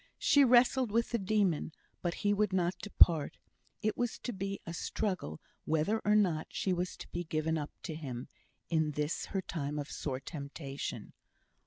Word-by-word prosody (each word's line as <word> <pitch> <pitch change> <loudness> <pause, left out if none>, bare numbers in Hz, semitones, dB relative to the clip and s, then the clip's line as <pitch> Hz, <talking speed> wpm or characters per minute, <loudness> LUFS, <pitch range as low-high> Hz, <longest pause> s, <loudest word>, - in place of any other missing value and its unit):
She 285 - +5
wrestled 250 0 +5
with 230 +2 +1
the 235 - +1
demon, 190 -6 +1 0.3
but 175 -1 -1
he 205 - +5
would 210 -1 +2
not 180 -1 +2
depart; 170 -7 +4 0.5
it 215 - +1
was 245 -2 -1
to 245 - -3
be 195 0 -3
a 170 - -5
struggle 180 - -2 0.3
whether 160 +8 +1
or 210 +1 +4
not 180 -7 +2
she 190 - 0
was 180 +1 -2
to - - -9
be 175 - -3
given 160 0 -1
up 150 -2 -2
to 165 - -4
him, 135 -6 -5 0.4
in 155 -2 +1
this 150 +2 -2
her 195 -1 -2
time 150 -3 -3
of 145 0 -4
sore 130 -3 -3
temptation. 140 -1 -6
175 Hz, 175 wpm, -33 LUFS, 150-205 Hz, 0.5 s, She